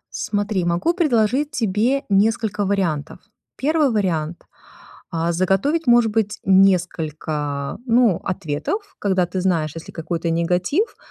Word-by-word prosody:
Смотри, 205 -3 -1
могу 175 - +1
предложить 275 - +1
тебе 240 +2 0
несколько 210 0 +1
вариантов. 185 -7 -1 0.4
1 300 0 +2
вариант: 175 -7 -1 0.7
а, 165 +1 -1
заготовить, 195 - +1
может 240 -2 +5
быть, 215 -1 -1
несколько, 160 -6 +1
ну, 230 -6 +3
ответов, 190 - -4
когда 190 -3 +1
ты 185 +2 -3
знаешь, 165 -5 0
если 165 - -9
какой-то 165 0 -3
негатив, 180 - 0
195 Hz, 115 wpm, -21 LUFS, 170-230 Hz, 0.7 s, может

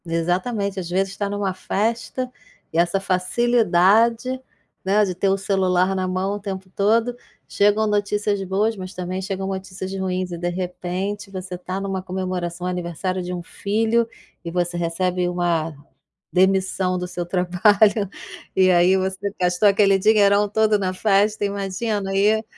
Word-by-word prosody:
Exatamente. 185 +5 -1
Às 175 -2 -5
vezes 190 +2 0
está 205 +1 -2
em 200 - -3
uma 200 -2 -1
festa, 230 +6 -2 0.4
e - - -1
essa 175 +3 +2
facilidade, 225 +4 +2 0.4
né, 200 +3 +3
de 185 - -2
ter 195 +2 0
o 195 - +2
celular 190 -1 +1
na 185 -1 -1
mão 185 +2 -1
o - - -5
tempo 190 -2 -6
todo. 230 +4 +2 0.3
Chegam 205 +2 +2
notícias 205 -1 0
boas, 200 +4 0
mas 185 0 -7
também 180 +1 -4
chegam 195 0 -3
notícias 190 0 -5
ruins, 185 -1 -2
e 170 - -4
de 175 +1 -2
repente, 185 +3 -4
você 185 -1 -6
está 180 +1 -5
em 195 - -3
uma 190 -1 -2
comemoração, 180 -2 -4
aniversário 180 +1 -2
de 180 0 -4
um 175 -1 -5
filho, 225 +5 0 0.4
e 170 - -5
você 175 0 -1
recebe 180 +1 0
uma 170 -3 0 0.6
demissão 190 0 +2
do 180 0 -3
seu 175 -1 -4
trabalho, 195 +3 +3 0.5
e 185 -1 +5
aí, 180 +1 +5
você 190 +1 -2
gastou 180 +3 +3
aquele 195 -1 +4
dinheirão 205 0 +4
todo 215 0 +2
na 185 -1 -1
festa, 205 +2 +2
imagina, 200 +1 -2
e 215 +3 +3
190 Hz, 155 wpm, -22 LUFS, 180-205 Hz, 0.6 s, e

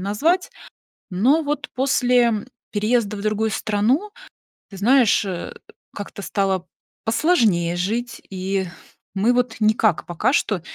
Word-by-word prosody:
назвать. 300 - 0 0.6
Но 255 - +3
вот 295 -1 -3
после 245 -4 +2 0.2
переезда 215 0 +1
в - - -6
другую 215 +1 0
страну, 220 - 0 0.6
ты 195 - -10
знаешь, 230 0 +4
э, 180 -3 -5 0.4
как-то 200 0 -7
стало 190 -3 -1 0.4
посложнее 220 - +2
жить, 230 +7 -2
и 190 0 -2 0.5
мы 205 +5 +2
вот 245 -2 0
никак 215 -3 +2
пока 175 - 0
что 205 - +1
215 Hz, 115 wpm, -22 LUFS, 195-245 Hz, 0.6 s, знаешь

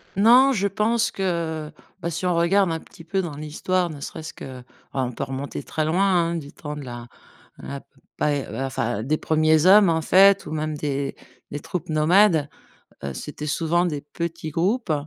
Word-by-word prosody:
Non, 245 +7 +6
je 200 -3 +1
pense 220 +3 +1
que, 165 -5 -2 0.3
bah, 170 - -2
si 170 - -4
on 180 -1 +2
regarde 175 +2 +3
un 160 - -2
petit 165 - -15
peu 190 +4 -1
dans 160 -5 -5
l'histoire, 170 +4 -1
ne 150 -2 -8
serait-ce 160 +3 -7
que, 130 -1 -9
oh, - - -17 0.3
on 130 -2 -1
peut 115 - -4
remonter 135 +2 -5
très 155 -1 -2
loin, 170 +5 +1 0.3
hein. - - -2
Du 145 -3 -6
temps 150 -1 -7
de 150 - -7
la 120 -2 -8 0.5
la 140 0 -7 0.4
pa 150 - +1 0.3
enfin 120 -4 -2
des 155 +4 0
1ers 155 0 +2
hommes, 195 0 +7
en 160 -1 +1
fait, 195 +4 +5
ou - - -7
même 155 0 -2
des 140 -1 -2 0.4
des 145 - -4
troupes 180 +2 -5
nomades, 160 0 +4 0.6
heu, 70 -1 -4
c'était 150 - -6
souvent 165 +3 +1
des 150 -4 -2
petits 165 +1 -5
groupes 185 - 0
160 Hz, 185 wpm, -23 LUFS, 150-185 Hz, 0.6 s, hommes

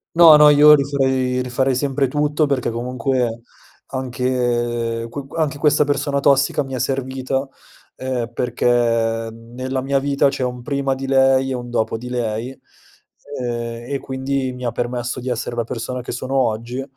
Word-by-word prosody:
No, 165 -2 +9
no, 150 0 +8
io 150 +1 +8
rifarei 130 -3 +1
rifarei 130 +1 0
sempre 135 +1 0
tutto 150 +2 +1
perché 135 -4 0
comunque 125 0 -2 0.5
anche 120 -3 -1
qu 135 +2 -7
anche 155 -3 -1
questa 150 0 +3
persona 145 0 0
tossica 140 +1 +2
mi 135 - -9
è - - -2
servita, 130 +1 -2 0.5
ehm, 125 -3 -3
perché 120 0 -2 0.6
nella 125 +4 -5
mia 135 +1 +1
vita 140 0 +2
c'è 135 -1 -3
un 125 -1 -4
prima 140 0 -1
di 135 0 -5
lei 135 0 +3
e - - -1
un 120 -1 -5
dopo 115 -2 -1
di 125 +2 -8
lei, 115 -1 -2 0.9
ehm, 120 0 -4
e 140 - 0
quindi 130 0 -2
mi 125 0 -8
ha 120 - -1
permesso 120 +1 -3
di 125 - -6
essere 120 -1 -3
la 120 - 0
persona 125 +2 -5
che 125 - -6
sono 130 +2 -4
oggi, 120 0 -1
130 Hz, 165 wpm, -20 LUFS, 120-135 Hz, 0.9 s, No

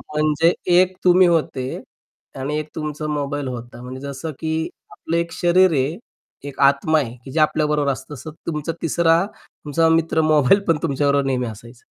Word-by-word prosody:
म्हणजे 155 +2 +3 0.2
एक 185 +1 +4
तुम्ही 180 0 +6
होते 145 -6 -1 0.6
आणि 145 +3 -2
एक 155 - -6
तुमचा 150 -1 -4
मोबाईल 145 -1 -2
होता. 120 -1 -7
म्हणजे 130 +1 -8
जसं 140 +3 -5
की 160 0 -2 0.2
आपलं 165 - -3
एक 170 0 -2
शरीर 180 +2 +3
आहे, 140 +4 0 0.5
एक 140 - -13
आत्मा 140 +3 +4
आहे, 120 -4 -4
की 135 - -8
जे 160 - -1
आपल्याबरोबर 150 -2 +2
असतं. 135 +2 -7
तसं 155 +4 -9 0.2
तुमचा 150 0 -2
तिसरा 165 +2 +2
तुमचा 160 +2 -2
मित्र 160 0 +2
मोबाईल 150 +6 +5
पण 165 -2 +3
तुमच्याबरोबर 140 -2 +1
नेहमी 125 -2 -1
असायचा. 115 +3 -11
150 Hz, 165 wpm, -21 LUFS, 140-165 Hz, 0.6 s, तुम्ही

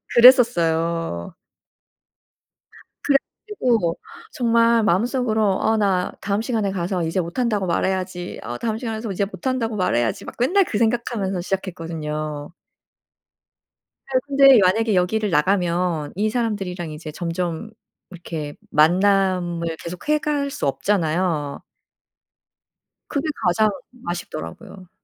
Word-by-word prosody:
그랬었어요. 170 - +4 1.7
그래 285 - +2 0.3
가지고 230 - +1 0.3
정말 230 -1 +3
마음속으로 220 +4 +1 0.2
'어 220 - +2
나 190 -4 +1
다음 200 +1 0
시간에 220 -5 -1
가서 180 -1 -2
이제 165 +3 -1
못한다고 205 +3 -1
말해야지. 185 0 -2
어 120 +1 -5
다음 220 -2 -2
시간에 225 -2 -4
가서 220 -2 -4
이제 195 +2 0
못한다고 225 +4 -2
말해야지.' 120 - 0
막 - - -9
맨날 365 +11 +3
그 215 - -2
생각하면서 220 -5 0
시작했거든요. 160 -5 -4 1.6
네. 260 -1 +2
근데 275 -3 +7
만약에 210 +3 +2
여기를 210 +4 +1
나가면 175 -2 +1
이 210 +3 +1
사람들이랑 195 -8 -2
이제 155 0 -7
점점 170 +4 -3 0.4
이렇게 160 -4 -6 0.2
만남을 175 0 +2
계속해 180 - -2
갈 285 -1 -1
수 - - -4
없잖아요. 160 0 0 1.5
그게 285 +1 -2 0.2
가장 215 +4 +3 0.4
아쉽더라고요. 175 - -7
190 Hz, 280 characters per minute, -22 LUFS, 170-225 Hz, 1.7 s, 근데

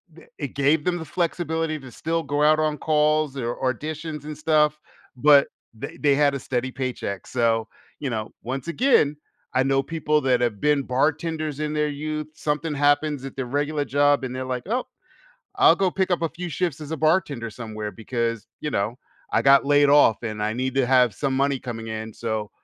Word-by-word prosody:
n 165 - -15
th - - -22
it 140 - -3
gave 145 +2 +2
them 180 -1 +1
the 160 - -6
flexibility 165 -1 -1
to 130 -2 -12
still 165 +4 -2
go 145 0 0
out 155 +1 +5
on 155 -1 0
calls, 155 -2 +1
or 120 -2 -2 0.2
auditions 155 +2 -6
and 150 -1 -6
stuff, 150 -1 +2 0.4
but 145 +1 +6 0.3
they 110 - -8
they 145 -2 +3
had 145 0 +3
a 140 - -3
steady 130 0 -2
paycheck, 125 -7 -4
so, 115 -2 +1 0.3
you 140 - -3
know, 110 -3 -4
once 130 +5 -4
again, 170 - +3 0.4
I 130 - +3
know 135 0 +2
people 150 0 0
that 130 -3 +2
have 115 -5 -1
been 150 -2 +2
bartenders 155 +3 -1
in 150 0 -2
their 150 0 +1
youth, 155 +1 -4
something 150 +1 -2
happens 145 -1 +1
at 135 - -8
their 135 - -3
regular 145 +3 -1
job, 145 0 +3
and 130 -1 -4
they're 130 0 -4
like, 125 -1 -3
"Oh, 245 +5 -1 0.7
I'll 390 -1 +6
go 190 -2 +2
pick 190 +1 -1
up 175 -2 +1
a 165 - +1
few 175 +1 -6
shifts 170 -3 -2
as 150 -1 -8
a 160 - -2
bartender 150 -7 +1
somewhere 110 -2 -6
because, 115 -1 -3
you 150 - -3
know, 110 +1 -1 0.3
I - - +3
got 135 0 +6
laid 145 0 +5
off 140 -7 +5
and 110 -2 -4
I 105 +1 0
need 130 +2 -2
to 135 -2 +3
have 125 -4 +4
some 135 +5 -1
money 140 0 +1
coming 115 -3 -6
in, 110 0 -5
so 110 -2 -3
145 Hz, 205 wpm, -24 LUFS, 125-155 Hz, 0.7 s, but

